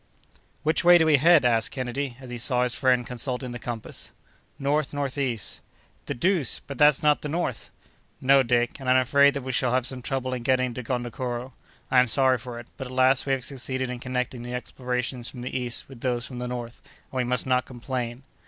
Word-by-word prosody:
"Which 155 +1 +2
way 175 0 +8
do 160 - +3
we 155 -2 +5
head?" 160 0 +5
asked 115 -2 +2
Kennedy, 130 0 -4
as 130 -2 -10
he 120 - -5
saw 125 +1 +3
his 125 -1 0
friend 125 -1 +2
consulting 125 +1 -3
the 120 - -6
compass. 115 -2 -6 0.5
"North 145 +1 0
northeast." 135 -5 -2 0.5
"The - - -2
deuce! 170 - +1
but 140 -2 -8
that's 150 -1 +5
not 150 -1 +4
the 150 - -4
north?" 170 +4 -3 0.5
"No, 135 +1 +5
Dick; 120 +1 +1
and 130 -2 -3
I'm 130 - +6
afraid 140 +3 +4
that 140 - -3
we 130 - -3
shall 125 -1 +1
have 130 -1 +2
some 130 -1 -2
trouble 130 0 -2
in 125 - -3
getting 130 0 +1
to 125 - -5
Gondokoro. 125 +1 -4 0.4
I 130 - +6
am 125 - +4
sorry 130 +1 +3
for 120 0 -7
it; 120 - -12
but, 135 - -5
at 125 - -10
last, 130 +1 +3
we 135 - +2
have 130 -2 -2
succeeded 130 -1 -3
in 125 - -5
connecting 125 -1 -3
the 120 +1 -5
explorations 125 0 -3
from 125 - -9
the 125 - -5
east 125 -2 -2
with 130 -4 -13
those 120 -2 -1
from 125 -2 -7
the 125 - -3
north; 120 -1 -6 0.3
and 130 - -5
we 125 - +2
must 125 0 0
not 130 -1 +2
complain." 125 0 -5
130 Hz, 220 wpm, -26 LUFS, 125-135 Hz, 0.5 s, way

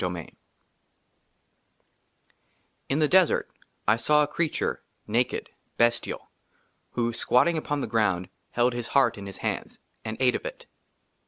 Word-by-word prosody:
d - - -2
Ill 90 - -4 2.7
IN 135 - +1
THE 155 -1 +4
DESERT 185 0 +3 0.4
I 110 - +5
SAW 150 +6 +4
A - - 0
CREATURE, 160 +1 -1 0.2
NAKED, 120 +4 0 0.3
BESTIAL, 120 0 +1 0.7
WHO, 120 -1 0
SQUATTING 125 +8 +3
UPON 145 -2 -1
THE - - -1
GROUND, 105 -5 +1 0.2
HELD 120 +1 +2
HIS 120 -1 -3
HEART 120 -6 +4
IN 100 - -7
HIS 95 - -7
HANDS, - - -3 0.3
AND 110 0 -4
ATE 125 -1 +4
OF - - -4
IT. - - -9
120 Hz, 140 wpm, -27 LUFS, 115-145 Hz, 2.7 s, I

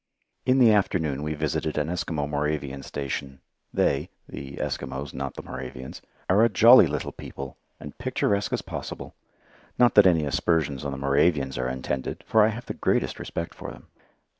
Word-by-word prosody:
In 130 +1 +4
the 120 -4 +7
afternoon 80 -8 +1
we 75 +1 -2
visited 75 +1 -2
an 75 0 0
Eskimo 80 -4 -2
Moravian 75 -2 -2
station. 70 -1 -5 0.3
They 70 +5 +1 0.2
the 70 0 -8
Eskimos, 70 +1 -4
not 70 0 -4
the - - -7
Moravians 65 0 -8 0.3
are 100 +5 +4
a 115 - +5
jolly 115 -1 +8
little 75 0 -3
people, 70 -1 -8 0.2
and 75 - -9
picturesque 105 -5 0
as - - -1
possible. - - -7 0.6
Not 120 -1 +5
that 105 -2 +8
any 80 -4 +3
aspersions 70 -1 0
on 70 - -2
the 70 - -5
Moravians 70 0 +2
are 65 0 -1
intended, 65 +1 -4
for 110 - +4
I 105 - +6
have 115 +2 -4
the - - -4
greatest - - 0
respect 85 - -5
for - - -8
them. - - -13
75 Hz, 170 wpm, -26 LUFS, 70-90 Hz, 0.6 s, jolly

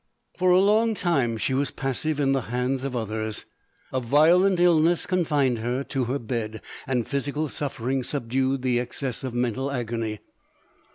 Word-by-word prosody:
For 185 0 +2
a 180 - +6
long 215 +3 +3
time 140 - +1
she 130 - -1
was 140 +2 +1
passive 140 +3 -2
in 135 -1 +2
the 135 -1 +2
hands 125 +2 -1
of 135 -2 -3
others. 110 -1 -3 0.5
A 130 - +1
violent 170 +9 +4
illness 170 -1 +4
confined 145 -9 +1
her 120 +4 -1
to 135 -2 -2
her 130 +4 -1
bed, 110 -3 -4 0.3
and 125 -4 0
physical 145 +2 -1
suffering 135 -2 -2
subdued 130 0 -1
the 125 -2 +2
excess 125 +1 -4
of 130 -2 -4
mental 125 +2 -1
agony. 115 -4 -3
135 Hz, 160 wpm, -25 LUFS, 120-150 Hz, 0.5 s, a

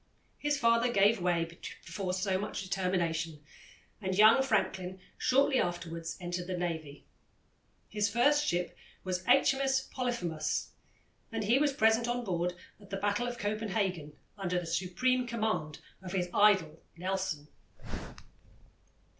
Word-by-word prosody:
His 290 0 +1
father 230 -1 +3
gave 205 -1 +4
way 175 -2 +2
before 170 +2 -6
so 185 0 0
much 205 0 -4
determination, 170 -4 -1 0.6
and 190 -1 -2
young 220 +5 +7
Franklin 190 -6 0 0.2
shortly 270 0 +3
afterwards 165 -1 -3
entered 175 0 -4
the 185 -1 -2
Navy. 160 -5 -4 0.8
His 205 -1 0
first 285 +7 +3
ship 175 - -1 0.3
was 185 -1 -2
H.M.S. 270 +1 +4
Polyphemus, 235 -12 -2 0.6
and 225 -1 -2
he 235 +6 +4
was 295 -1 +3
present 225 -1 +3
on 240 0 -1
board 180 -3 -1 0.2
at 200 -2 -16
the 195 - -3
battle 205 +4 0
of 245 0 -4
Copenhagen, 205 -7 -2 0.3
under 180 -2 0
the 175 - -6
supreme 245 +10 0
command 215 -10 -2 0.2
of 185 -1 -7
his 180 -2 0
idol 190 -7 +4 0.2
Nelson. 185 -4 -2
195 Hz, 130 wpm, -31 LUFS, 175-230 Hz, 0.8 s, young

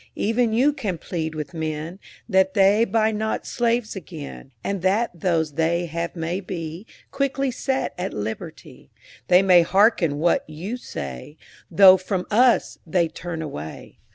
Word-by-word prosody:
Even 230 +2 +1
you 260 +7 +3
can 210 - -3
plead 160 -1 -4
with 150 -2 -6
men 160 +2 -4 0.3
That 190 -2 +2
they 200 +3 +5
buy 220 -1 +1
not 220 +1 -2
slaves 235 -2 -1
again, 155 -7 -9
And 200 -2 -2
that 200 +6 +1
those 165 -3 -1
they 165 +3 0
have 170 +1 -4
may 170 +2 -2
be 175 0 -6 0.2
Quickly 275 -1 -1
set 265 +2 -2
at 185 +2 -2
liberty. 105 +1 -7 0.4
They 180 +1 +5
may 180 -2 +6
hearken 175 -4 +3
what 170 +3 +2
you 175 +10 -5
say, 70 - -8 0.3
Though 190 +2 +8
from 185 0 -3
us 245 +3 +3
they 170 0 +1
turn 165 -1 -6
away. 80 - -8
180 Hz, 150 wpm, -23 LUFS, 160-215 Hz, 0.4 s, Though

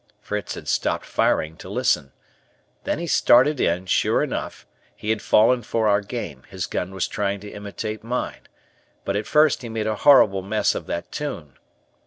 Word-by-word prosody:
Fritz 105 -2 -4
had - - -10
stopped - - 0
firing 80 0 0
to - - -10
listen. 70 - 0 0.7
Then - - 0
he 170 - -4
started 140 -2 +4
in; 90 +2 +1
sure 90 - +2
enough, - - -5 0.3
he 105 - -2
had 110 - -1
fallen 120 +3 +4
for 110 0 0
our 100 -1 +3
game, 100 - -6
his 95 -4 -4
gun 90 +4 -3
was 95 - -1
trying 100 -1 -2
to 105 - -9
imitate 105 +1 -6
mine, 125 +2 -4 0.6
but, 100 - -1
at 105 +1 -2
first 150 -1 +4
he 120 - -7
made 110 -1 -3
a 110 - 0
horrible 105 -9 +5
mess 105 +3 +1
of - - -6
that 85 - -4
tune. 85 - -5
105 Hz, 180 wpm, -23 LUFS, 95-120 Hz, 0.7 s, horrible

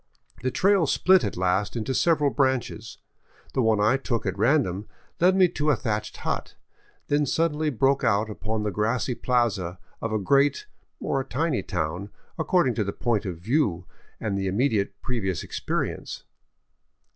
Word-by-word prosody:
The 130 - 0
trail 190 +3 +3
split 185 +6 +4
at - - -3
last 95 +4 0
into 120 +3 -2
several 150 -2 +3
branches. 130 -5 -1 0.6
The 130 - +1
one 110 -2 +3
I 110 +6 +3
took 115 -5 -2
at 95 -2 -1
ran 135 +9 +3
dom 95 +2 -5 0.3
led 185 +2 +5
me 190 -1 +6
to 155 -3 -1
a 145 - +4
thatched 105 -1 -3
hut, - - -3 0.5
then 145 0 +2
suddenly 155 +1 +1
broke 135 +2 +2
out 110 -2 +2
upon 110 0 -3
the 105 - -1
grassy 110 +5 0
plaza 115 -9 0 0.2
of 115 - -2
a 110 - +1
great, 140 - +2 0.3
or 135 - -1
a - - -4
tiny 140 +2 -1
town, 90 +2 -3 0.3
according 160 -5 +2
to 110 - 0
the 100 - -3
point 110 -4 -1
of 90 -3 -4
view 95 - 0 0.3
and 105 -3 -2
the 95 0 -1
immediate 100 -2 0
previous 95 -9 -2
experience. - - -3
115 Hz, 165 wpm, -25 LUFS, 100-140 Hz, 0.6 s, me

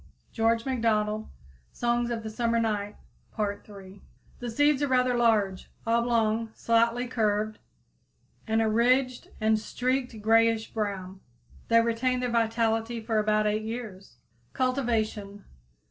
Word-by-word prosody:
George 225 0 +1
MacDonald 220 -4 0 0.4
"Songs 240 0 0
of 230 -2 -3
the 220 - -5
Summer 230 +1 0
Night," 210 -2 -1 0.4
Part 205 -1 -3
III 195 -1 -12 0.4
The 245 - -4
seeds 290 +4 +2
are 290 - +2
rather 255 -1 +2
large, 215 -5 +1 0.2
oblong, 230 -1 +1
slightly 230 +1 +2
curved, 215 -3 -1 0.9
and 220 0 +2
a - - +1
ridged 250 +3 +2
and 220 0 +2
streaked 250 +1 -2
grayish 225 +1 +2
brown. 195 -3 -4 0.5
They 230 0 +5
retain 235 +2 0
their 250 -1 -2
vitality 230 0 0
for 220 -1 0
about 215 0 +2
eight 210 +1 +1
years. 215 - -7 0.4
_Cultivation. 225 -6 -1
225 Hz, 125 wpm, -27 LUFS, 215-240 Hz, 0.9 s, They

